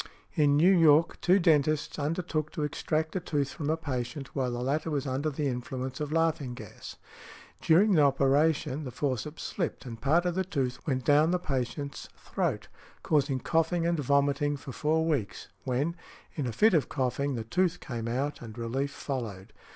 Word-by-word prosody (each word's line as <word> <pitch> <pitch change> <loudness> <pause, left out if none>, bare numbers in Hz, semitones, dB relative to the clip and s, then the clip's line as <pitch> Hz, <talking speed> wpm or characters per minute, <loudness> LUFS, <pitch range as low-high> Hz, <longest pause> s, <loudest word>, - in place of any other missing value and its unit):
In 145 -2 +3
New 180 +5 +6
York, 160 -1 +4
two 185 +2 +5
dentists 155 -4 +2
undertook 155 0 -2
to 150 - -2
extract 155 +2 -2
a - - +1
tooth 145 -5 -1
from 150 -3 -4
a 160 - +1
patient 135 -3 -5
while 130 -3 0
the 120 0 -3
latter 150 +5 -1
was 145 -3 -1
under 135 +3 -1
the 150 0 -3
influence 130 +1 -4
of 150 -1 -3
laughing 155 -6 0
gas. - - -10 0.7
During 190 +7 +5
the 165 -6 +5
operation 140 +1 +2
the 130 - -5
forceps 145 +4 -3
slipped, 170 -8 -3
and 115 -3 -8
part 165 +6 +3
of 175 - +1
the 190 +2 0
tooth 135 -8 -2
went 130 -4 -1
down 150 +2 +5
the 180 - +2
patient's 140 -2 -4
throat, - - -2 0.4
causing 140 -3 +1
coughing 165 +3 +1
and 170 -1 +1
vomiting 140 +1 +1
for 135 - -9
four 155 +4 +1
weeks, 140 -11 -2 0.2
when—in 140 +1 -4
a - - -2
fit 215 - +4
of 155 -5 +2
coughing—the 130 -2 -1
tooth 180 +8 0
came 115 -4 -5
up, 135 +5 -2
and 115 -1 -9
relief 125 +4 -2
followed. 115 -10 -5
145 Hz, 175 wpm, -29 LUFS, 130-160 Hz, 0.7 s, New